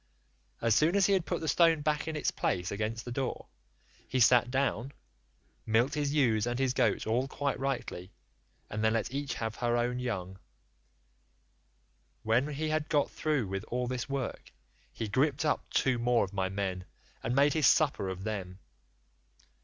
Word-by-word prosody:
As 115 -1 +4
soon 155 - +3
as 200 -1 +4
he 200 - +3
had 185 -4 +1
put - - -2
the 160 - -3
stone 165 -1 +4
back 150 0 0
to 160 -1 -3
its - - 0
place 90 0 -1
against 110 +3 -3
the 120 - -6
door, 130 +1 -3 0.6
he 130 - -1
sat 120 0 +5
down, 135 0 -1 0.7
milked 115 +5 +2
his 145 -1 0
ewes 120 -7 +2
and 120 0 -1
his 130 -1 +1
goats 110 -5 +1
all 120 +4 0
quite 140 0 -2
rightly, 125 -9 -3 0.6
and 110 +1 -4
then 110 0 +3
let 115 +2 -1
each 140 -1 -3
have 110 -1 -4
her 120 -1 +1
own 120 +1 0
young 95 -6 -4 1.8
one; 115 +4 +2
when 150 - -5
he 155 +2 -2
had 155 0 -1
got 145 -2 +2
through 150 -6 0
with 95 0 -4
all 125 +1 -2
this 125 0 -4
work, 135 -3 -4 0.4
he 115 - -4
gripped 135 +7 +1
up 150 - 0
two 130 -3 +1
more 120 -1 +3
of 95 0 -6
my 95 -1 -1
men, 95 -2 -3 0.4
and 120 - -2
made 140 +1 +4
his 155 -4 +3
supper 140 -11 +3
off 95 0 -5
them. 95 -3 -4
125 Hz, 180 wpm, -30 LUFS, 110-145 Hz, 1.8 s, sat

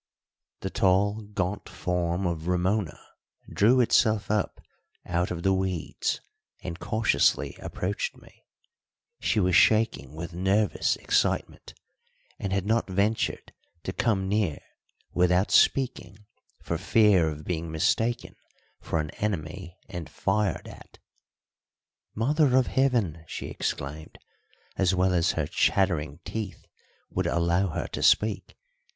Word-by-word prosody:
The 95 - -4
tall, 100 +3 +2
gaunt 95 0 -3
form 90 +1 -1
of 85 -2 -2
Ramona 90 0 0 0.5
drew 120 +6 +3
itself 110 -4 +2
up 105 -2 -1 0.5
out 90 +1 0
of 85 -1 -4
the 95 - +3
weeds 95 -3 -2 0.4
and 85 -2 -5
cautiously 110 +2 +1
approached - - -3
me. - - -20 0.8
She 110 - +1
was 90 -3 +2
shaking 110 - +3
with 85 +1 -6
nervous 95 +3 +1
excitement, - - -1 0.6
and 100 - -3
had 100 -1 0
not 110 0 +1
ventured 100 +4 -1 0.3
to 95 - -4
come 95 -4 0
near 100 -7 0 0.6
without 90 +2 +2
speaking 105 -7 +2 0.4
for - - -2
fear 100 -7 +4
of 75 0 -7
being 85 -2 -3
mistaken 110 +9 0 0.4
for 80 - -2
an 75 -1 -3
enemy 90 -2 -3
and 85 -4 -7
fired 100 -2 -1
at. - - -13 1.2
"Mother 135 +3 +3
of 130 - +4
Heaven!" 115 - +1
she - - -6
exclaimed, 75 +3 -4 0.6
as 95 -1 +2
well 90 0 +2
as 85 -1 +2
her 80 - -1
chattering 80 -3 +1
teeth 110 -3 -5 0.5
would - - -1
allow 85 +3 +1
her 80 - -3
to - - -5
speak. 105 -2 +2
95 Hz, 120 wpm, -27 LUFS, 85-105 Hz, 1.2 s, fear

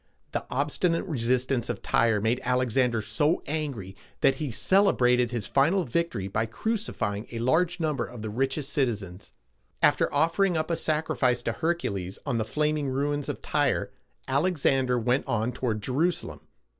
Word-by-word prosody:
The - - -3
obstinate 150 +5 0
resistance 130 - 0
of - - -4
Tyre 115 -2 +2
made 110 +4 0
Alexander 125 -2 +1
so 150 +8 +1
angry, 140 -12 -4 0.3
that 135 - +4
he 150 -3 -3
celebrated 125 - +3
his 120 -4 -3
final 165 +8 +2
victory 130 - -1
by 105 +3 -1
crucifying 115 - -2
a 115 - -5
large 160 +10 +1
number 150 -6 0
of 120 -3 -9
the 110 - -4
richest 135 +4 -1
citizens. 105 -9 -2 0.5
After - - +4
offering 165 +4 +2
up 155 +2 -1
a - - +2
sacrifice 150 -6 0
to - - 0
Hercules 105 - -2
on 125 -5 0
the 110 - -1
flaming 150 +2 0
ruins 145 +2 -1
of - - -5
Tyre, - - 0 0.4
Alexander 135 -4 +2
went 125 +4 0
on 115 -1 0
toward 115 -4 -2
Je 130 - -3
ru´sa 170 +7 +1
lem. - - -10
130 Hz, 155 wpm, -27 LUFS, 115-155 Hz, 0.5 s, that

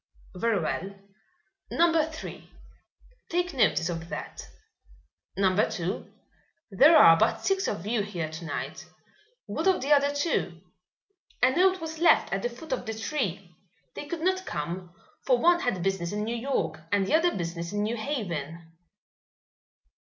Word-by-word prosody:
"Very 215 +2 0
well; 190 +4 -3 0.7
Number 330 -1 +3
Three, 320 - -9 0.8
take 355 0 -1
notice 215 -9 +2
of 165 -1 -5
that. - - -7 0.9
Number 195 +1 +2
Two, 180 -2 -4 0.6
there 295 - +7
are 165 - +9
but - - +1
six 385 0 +1
of 200 -3 -3
you 220 +1 0
here 185 -6 -4
to 160 +2 -8
night. - - -5 0.6
What - - -2
of 380 - +4
the 275 +3 -3
other 285 0 +3
two?" 285 - -1 0.8
"A 255 - +6
note 375 +2 +3
was 320 -1 -6
left 340 - +4
at 195 - -1
the 240 - -1
foot 260 +5 -7
of 245 - -4
the 220 - -3
tree. 200 - -3 0.4
They 290 - -7
could 340 -1 -5
not 375 +2 +1
come, 175 +4 -4 0.3
for 255 -2 +3
one 345 +7 +4
had 215 - -1
business 190 -3 -1
in 210 +1 -2
New 230 +2 -2
York 215 - -2
and 200 -1 +2
the - - -2
other 335 +2 +3
business 170 -1 -4
in 205 0 -1
New 220 +3 -1
Haven." 170 - -4
215 Hz, 155 wpm, -27 LUFS, -, 0.9 s, are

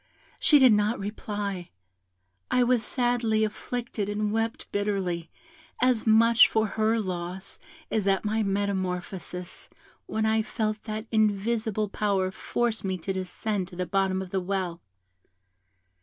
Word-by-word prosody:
She 300 - +6
did 260 -5 +7
not 210 +3 +2
reply. 205 -3 -4 0.8
I 250 - +3
was 245 -1 +3
sadly 240 -3 +1
afflicted 220 -1 -3
and 205 0 -1
wept 225 +1 -1
bitterly, 190 -5 -1 0.5
as 250 -3 +2
much 230 +1 +6
for 220 0 +2
her 220 +2 +1
loss 185 0 -4 0.3
as 210 -3 0
at 195 +1 +2
my 220 +1 +1
metamorphosis, 185 -3 -3 0.4
when 220 0 -1
I 220 0 +3
felt 215 -1 -3
that 215 -1 -4
an - - -26
invisible 215 0 +1
power 195 -2 0
forced 235 +3 -2
me 190 -1 -1
to 190 +3 -3
descend 190 +1 -3
to 180 - -11
the 180 +1 -2
bottom 190 0 0
of 180 - -11
the 190 - 0
well. 180 -2 -2
210 Hz, 140 wpm, -27 LUFS, 190-220 Hz, 0.8 s, did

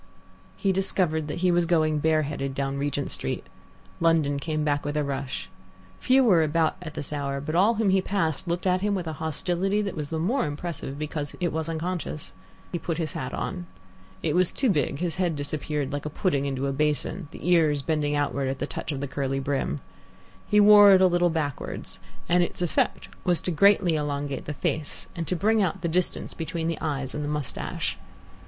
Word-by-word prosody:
He 195 - +1
discovered 180 -5 +1
that 155 +3 -4
he 180 - +5
was 175 -1 +2
going 155 -3 +2
bareheaded 150 -3 0
down 140 0 -2
Regent 145 0 -2
Street. - - -3 0.5
London 160 -4 +3
came 155 +1 -2
back 145 -1 +1
with 145 +1 -2
a 150 - +2
rush. 135 -2 -3 0.5
Few 265 +1 +4
were 185 -9 +5
about 160 +1 +2
at 160 -3 -8
this 145 +1 -4
hour, 140 -1 -2
but 150 +3 -4
all 200 +7 +4
whom 215 -3 +2
he 190 0 +4
passed 185 -4 -1
looked 175 +2 -2
at 185 0 +2
him 205 0 +1
with 180 -3 -3
a 160 - -3
hostility 175 +6 0
that 200 - -3
was 150 -3 -4
the 160 - -2
more 225 - +1
impressive 145 -2 -5
because 150 -1 -4
it 175 -3 0
was 160 0 -2
unconscious. 165 -2 -3 0.4
He 175 - -2
put 165 0 -3
his 160 -4 -2
hat 130 - -4
on. 180 -2 -4 0.6
It 155 - +1
was 180 -1 +3
too 260 -5 +1
big; 145 -5 0
his 175 +1 -2
head 175 -4 +1
disappeared 145 -1 -3
like 145 +1 -3
a - - -3
pudding 145 -3 0
into 135 0 -2
a 135 - 0
basin, 150 +4 -1
the - - -8
ears 155 -5 +3
bending 150 -2 0
outwards 140 -2 0
at 135 - -2
the 140 - -2
touch 150 - -5
of 140 -2 -3
the 140 - -2
curly 135 0 -2
brim. 140 +1 -1 0.7
He 210 - +5
wore 205 -1 +9
it 190 - +6
a - - +7
little 175 -1 +3
backwards, 155 -4 -3 0.3
and 175 +1 +4
its 175 0 -1
effect 170 - 0 0.2
was 175 -2 +2
greatly 185 +1 +4
to 160 - +1
elongate 145 -1 -3
the 150 - -4
face 155 +1 -2
and 165 -3 -4
to 180 - 0
bring 215 +5 +3
out 180 -5 0
the - - +1
distance 175 +2 0
between 165 0 -3
the 165 - -2
eyes 140 -4 -2
and 150 - -3
the 145 - -2
moustache. 150 -2 -3
160 Hz, 205 wpm, -26 LUFS, 145-180 Hz, 0.7 s, wore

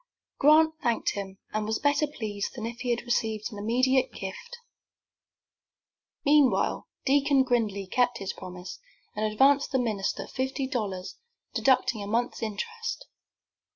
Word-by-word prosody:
Grant 315 +2 +6
thanked 235 -2 +1
him, 195 -1 -6 0.2
and 215 0 -1
was 220 - 0
better 290 +1 +2
pleased 215 -8 -4
than 230 -3 -5
if 230 +1 -6
he 250 - -3
had 240 0 0
received 225 -2 -1
an 205 - -7
immediate 255 +5 +2
gift. 470 - -7 1.7
Meanwhile 290 -2 +3 0.2
Deacon 280 0 +4
Gridley 220 -6 0
kept 245 +4 +1
his 195 -3 -4
promise, 180 0 -9 0.4
and 215 0 0
advanced 275 +6 +4
the 265 - +2
minister 215 -6 -1
fifty 265 +1 -2
dollars, 205 -8 -4 0.4
deducting 250 -4 +2
a 200 - -5
month's 235 +4 -1
interest. 455 - -4
240 Hz, 135 wpm, -27 LUFS, 210-270 Hz, 1.7 s, Grant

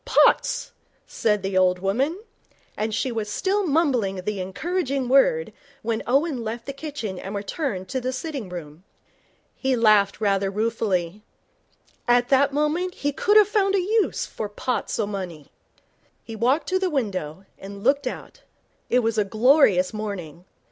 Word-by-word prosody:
'Pots,' - - +3 0.3
said 210 -3 0
the 195 0 -2
old 185 -1 +4
woman, 255 - -1 0.6
and 215 +1 -2
she 255 +4 -1
was 220 -2 -3
still 390 - 0
mumbling 270 - +1
the 195 +2 -4
encouraging 275 - -2
word 475 - +3 0.3
when 225 0 -1
Owen 275 0 +1
left 230 +1 -5
the 275 - -5
kitchen 275 -10 -5
and 195 +2 -6
returned 200 - -3
to 260 - -2
the 255 +1 -2
sitting 260 - -5
room. 165 -2 -9 0.7
He 265 -1 0
laughed 215 -4 +4
rather 195 -2 +1
ruefully. 205 -3 -1 0.9
At 245 0 +3
that 275 +1 +4
moment 305 +6 0
he 290 - -1
could 415 +9 +3
have 420 -2 +7
found 400 -2 +2
a - - +3
use 420 +3 +1
for 210 - -6
pots 245 +4 -3
o' 220 - 0
money. 185 -7 -6 0.7
He 225 - -8
walked 250 +8 +1
to 375 0 +1
the 375 -1 0
window, 195 - -3
and 200 +1 -9
looked 280 +3 +2
out. - - -7 0.5
It 250 - +3
was 225 -1 0
a - - +4
glorious 215 - +4
morning. 180 -6 -6
230 Hz, 155 wpm, -24 LUFS, 195-285 Hz, 0.9 s, have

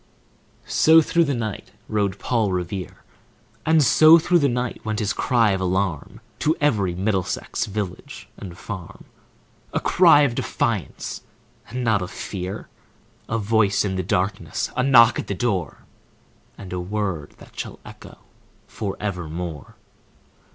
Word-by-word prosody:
So 160 +1 +5
through 170 +1 +2
the 140 -2 -1
night 110 -4 -5 0.2
rode 100 -2 -1
Paul 110 -4 0
Revere; 90 +1 -4 0.6
And 160 -1 +5
so 155 +6 +7
through 175 +1 +2
the 140 -2 +2
night 125 0 -3
went 110 -1 -2
his 105 -2 -1
cry 115 -4 +2
of 95 -1 -1
alarm 95 -4 -2 0.2
To 155 +2 +1
every 105 -12 +1
Middlesex 95 -1 -2
village 100 -3 -6
and 90 -3 -9
farm,— 95 -4 -8 0.7
A - - +1
cry 170 -5 +5
of 140 -5 +2
defiance 110 - -3 0.5
and 125 +3 -4
not 110 -4 +2
of 90 - -4
fear, 95 +1 -6 0.6
A 115 - 0
voice 105 -2 +2
in 95 -2 -2
the 95 - -1
darkness, 95 +3 -2
a - - +1
knock 120 -3 +6
at - - -5
the 100 - -2
door, 95 -8 -2 0.7
And 95 -2 -9
a 90 - -2
word 95 -4 -3
that - - -14
shall - - -6
echo - - -12 0.5
forevermore! 90 -6 -5
105 Hz, 140 wpm, -23 LUFS, 95-120 Hz, 0.7 s, so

